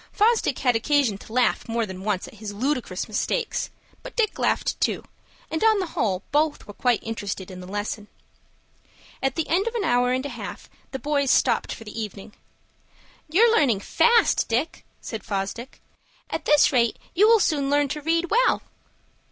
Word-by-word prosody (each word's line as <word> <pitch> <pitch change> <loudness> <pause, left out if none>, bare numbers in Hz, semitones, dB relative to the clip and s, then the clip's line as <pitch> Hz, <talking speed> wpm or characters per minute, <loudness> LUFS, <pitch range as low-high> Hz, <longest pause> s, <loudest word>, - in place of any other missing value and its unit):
Fosdick 430 - +2
had 250 -3 +2
occasion 240 -3 +2
to - - -14
laugh 250 0 +1
more 230 0 0
than 190 -2 -8
once 205 -3 -1
at - - -13
his 215 -1 -7
ludicrous 245 -6 -2
mistakes; 445 - -1 0.3
but - - -10
Dick 445 -4 0
laughed - - 0
too, - - 0 0.5
and 320 +4 -1
on 440 -1 +5
the 380 - -1
whole 195 -4 0
both 295 +1 +1
were 205 - -10
quite 245 +1 +1
interested 200 -4 -5
in 185 - -9
the 180 - -9
lesson. 205 +1 -4 1.1
At 270 -1 0
the 325 - -1
end 375 +6 +1
of 465 - -3
an 450 - 0
hour 245 -5 +2
and 260 +2 -1
a - - -3
half - - -8 0.2
the 265 - -4
boys 285 -1 0
stopped - - +2
for - - -7
the 225 +1 -6
evening. 210 0 -7 1.0
"You're 455 +8 +5
learning 240 - +3
fast, 470 - +3
Dick," 250 +8 -1 0.2
said 220 -2 -6
Fosdick. 200 +5 -4 0.5
"At 320 - -3
this 295 0 +5
rate 235 -4 +2 0.2
you 410 +5 +5
will 455 0 +6
soon 285 -7 +1
learn 290 0 +3
to 300 +2 -4
read 330 +3 0
well." - - +3
260 Hz, 180 wpm, -24 LUFS, 215-320 Hz, 1.1 s, will